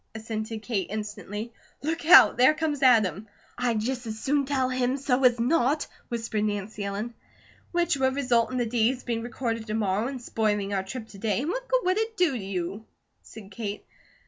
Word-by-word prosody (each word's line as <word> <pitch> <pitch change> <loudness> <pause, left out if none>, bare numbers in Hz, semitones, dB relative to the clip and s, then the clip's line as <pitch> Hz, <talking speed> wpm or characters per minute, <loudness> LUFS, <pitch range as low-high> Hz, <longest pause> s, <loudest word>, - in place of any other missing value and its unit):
assented 220 0 -5
Kate, 205 -7 -2
instantly. 210 +1 -5 0.3
"Look 325 +3 -2
out! 355 - +9
There 255 +5 +5
comes 300 -3 -2
Adam." 220 -5 +4 0.3
"I'd 240 -3 0
just 250 +1 -3
as 220 0 -4
soon 285 +2 +1
tell 265 -2 +1
him 255 +1 0
so 270 -1 0
as 245 -1 +4
not!" 280 +3 +2 0.2
whispered 225 -2 -2
Nancy 205 0 -3
Ellen. 205 +4 -4 0.6
"Which 345 -3 +1
would 265 -1 +1
result 245 -4 +2
in 255 - -2
the 245 - +1
deeds 240 +2 +1
being 230 -2 -2
recorded 230 -1 -3
to 215 - -2
morrow 210 +1 0
and 265 -1 -5
spoiling 210 -4 -1
our 195 - +1
trip 220 +4 -7
to 195 - -12
day, 215 +1 0
and 305 - -2
what - - -3
good - - +2
would 370 +3 +2
it 445 0 -2
do 355 -6 +3
you?" 195 -1 -4 0.3
said 205 -3 -13
Kate. 205 0 -5
235 Hz, 190 wpm, -26 LUFS, 215-265 Hz, 0.6 s, out